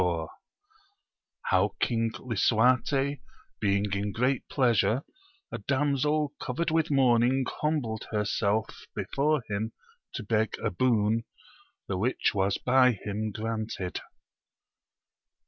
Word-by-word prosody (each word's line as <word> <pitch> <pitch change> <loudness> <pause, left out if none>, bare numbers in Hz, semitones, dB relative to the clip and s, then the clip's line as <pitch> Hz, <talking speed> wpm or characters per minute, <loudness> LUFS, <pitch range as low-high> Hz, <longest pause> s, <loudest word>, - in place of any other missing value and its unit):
— 410 -1 -39
How - - +2
King 115 -1 +1
Lisuarte 125 +4 +2 0.4
being 100 -1 +1
in 100 +1 -1
great 125 +5 +1
pleasure 120 -1 +2 0.5
a - - -4
damsel 145 +1 +1
covered 155 +6 -2
with 160 0 +2
mourning 130 -1 +3 0.2
humbled 140 -8 -1
herself 105 0 -1
before 145 -1 0
him 110 +2 -3 0.4
to - - -4
beg 110 0 0
a - - -2
boon, 110 +1 +2 0.6
the 95 -2 -2
which 125 +6 +1
was 100 0 +1
by 125 0 +4
him 105 +1 -4
granted. 110 -3 -4
120 Hz, 105 wpm, -28 LUFS, 105-135 Hz, 0.6 s, by